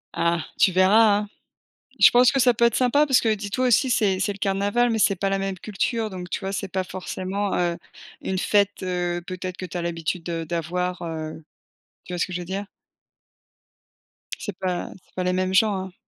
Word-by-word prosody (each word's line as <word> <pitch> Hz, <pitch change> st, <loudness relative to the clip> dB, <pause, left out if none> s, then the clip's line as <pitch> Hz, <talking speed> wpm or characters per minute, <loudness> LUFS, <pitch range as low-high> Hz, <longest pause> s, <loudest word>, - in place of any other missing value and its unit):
Ah, 170 Hz, -1 st, 0 dB
tu 190 Hz, -, +5 dB
verras, 205 Hz, +3 st, +5 dB
hein! 210 Hz, -, -6 dB, 0.7 s
Je -, -, +8 dB
pense 245 Hz, 0 st, +6 dB
que 275 Hz, -, 0 dB
ça 245 Hz, -1 st, +5 dB
peut 235 Hz, +1 st, +3 dB
être 235 Hz, -, +1 dB
sympa 285 Hz, +4 st, +3 dB
parce 265 Hz, -3 st, +4 dB
que 225 Hz, -2 st, +2 dB
dis-toi 215 Hz, +5 st, -1 dB
aussi 250 Hz, +3 st, +4 dB
c'est 195 Hz, -5 st, +2 dB
c'est 205 Hz, +2 st, 0 dB
le -, -, -12 dB
carnaval, 205 Hz, +5 st, +1 dB
mais 225 Hz, -, 0 dB
c'est 200 Hz, -2 st, +3 dB
pas 195 Hz, +2 st, -1 dB
la 195 Hz, -, +1 dB
même 195 Hz, -1 st, -3 dB
culture, 215 Hz, +2 st, -2 dB
donc 180 Hz, -1 st, -7 dB
tu -, -, -3 dB
vois, 195 Hz, 0 st, -4 dB
c'est 195 Hz, 0 st, -3 dB
pas 190 Hz, 0 st, -2 dB
forcément, 190 Hz, +2 st, -3 dB
heu, 175 Hz, -1 st, 0 dB, 0.4 s
une 190 Hz, -1 st, -2 dB
fête, 205 Hz, 0 st, +1 dB
heu, 175 Hz, -1 st, -2 dB
peut-être 185 Hz, 0 st, -5 dB
que -, -, -6 dB
tu 180 Hz, 0 st, -5 dB
as -, -, -2 dB
l'habitude, 170 Hz, 0 st, -3 dB
heu, 165 Hz, -1 st, -2 dB
d'avoir, 175 Hz, +2 st, -2 dB
heu, 160 Hz, -1 st, -5 dB, 0.6 s
tu 180 Hz, -, -9 dB
vois 175 Hz, -, -3 dB
ce -, -, +1 dB
que 185 Hz, -, -9 dB
je 180 Hz, -, -3 dB
veux -, -, -7 dB
dire? 195 Hz, +3 st, -4 dB, 1.7 s
C'est 205 Hz, -, -5 dB
pas 180 Hz, -2 st, -3 dB
c'est -, -, -32 dB
pas 185 Hz, -, -1 dB
les 180 Hz, 0 st, +1 dB
mêmes 185 Hz, 0 st, 0 dB
gens, 205 Hz, 0 st, +3 dB
hein! 185 Hz, -, -11 dB
190 Hz, 215 wpm, -24 LUFS, 180-210 Hz, 1.7 s, Je